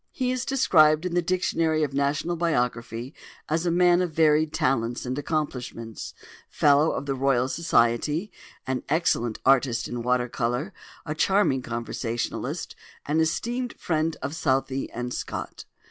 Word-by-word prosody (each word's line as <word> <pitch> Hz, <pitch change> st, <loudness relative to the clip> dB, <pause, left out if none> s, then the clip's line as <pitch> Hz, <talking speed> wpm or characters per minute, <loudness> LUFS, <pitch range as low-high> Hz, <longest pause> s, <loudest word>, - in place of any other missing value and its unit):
He 255 Hz, -1 st, -1 dB
is 255 Hz, -1 st, -2 dB
described 160 Hz, -, +4 dB
in 180 Hz, -, -2 dB
the 175 Hz, -, +2 dB
"Dictionary 165 Hz, -3 st, +1 dB
of 140 Hz, -2 st, -2 dB
National 145 Hz, +5 st, 0 dB
Biography" 125 Hz, -5 st, -1 dB, 0.3 s
as 160 Hz, +3 st, 0 dB
"a -, -, +3 dB
man 175 Hz, +1 st, +4 dB
of 180 Hz, -2 st, -1 dB
varied 155 Hz, 0 st, +3 dB
talents 120 Hz, -4 st, 0 dB
and 125 Hz, +1 st, -2 dB
accomplishments, 130 Hz, -6 st, -4 dB, 0.3 s
Fellow 145 Hz, +2 st, +4 dB
of -, -, -4 dB
the 140 Hz, -, -1 dB
Royal 130 Hz, -2 st, +1 dB
Society, 150 Hz, -, +1 dB, 0.3 s
an 130 Hz, -1 st, -2 dB
excellent 130 Hz, -8 st, +1 dB
artist 130 Hz, -3 st, +3 dB
in 120 Hz, -1 st, -4 dB
water 125 Hz, +1 st, +1 dB
colour, 125 Hz, -, -2 dB, 0.3 s
a 150 Hz, -, -2 dB
charming 175 Hz, -5 st, +2 dB
conversationalist, 120 Hz, 0 st, -4 dB, 0.3 s
an 150 Hz, +2 st, +1 dB
esteemed 240 Hz, +10 st, -1 dB
friend 160 Hz, -1 st, -1 dB
of 140 Hz, -, -3 dB
Southey 135 Hz, -4 st, 0 dB
and 125 Hz, +1 st, -5 dB
Scott." -, -, -5 dB
145 Hz, 145 wpm, -25 LUFS, 125-165 Hz, 0.3 s, described